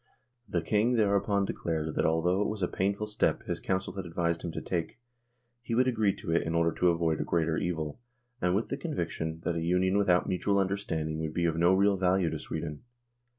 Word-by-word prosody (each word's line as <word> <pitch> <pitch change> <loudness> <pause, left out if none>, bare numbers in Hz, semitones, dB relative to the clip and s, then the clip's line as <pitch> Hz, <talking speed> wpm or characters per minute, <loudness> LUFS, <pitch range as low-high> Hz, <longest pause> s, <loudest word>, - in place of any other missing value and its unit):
The 85 -2 -1
King 110 +7 +2
thereupon 100 -2 +2
declared 80 -4 -2
that - - +1
although 85 +4 +2
it 105 - +1
was 105 -3 -3
a - - +3
painful 100 +4 -1
step 105 0 0
his - - -3
Council 95 -1 -2
had 95 - -4
advised 85 0 -1
him 85 - -4
to - - -3
take, 85 +2 -3 0.6
he 115 -1 -3
would 130 +2 +3
agree 110 -5 +2
to 80 - -5
it 85 - +3
in 80 +1 -2
order 85 0 +3
to 90 - +2
avoid 85 -2 +1
a - - +1
greater 80 -1 0
evil, 80 -2 -3 0.4
and 90 0 +2
with 110 - -1
the 135 - -2
conviction 80 - -3
that 85 - -1
a 85 - -1
Union 90 +3 +2
without 90 -3 +3
mutual 100 +2 +1
understanding 95 -6 -1
would 80 -1 -4
be 85 - +1
of 80 - +1
no 85 +3 +4
real 100 +1 +3
value 90 -2 +2
to - - -3
Sweden. 75 -1 -5
90 Hz, 215 wpm, -29 LUFS, 80-100 Hz, 0.6 s, no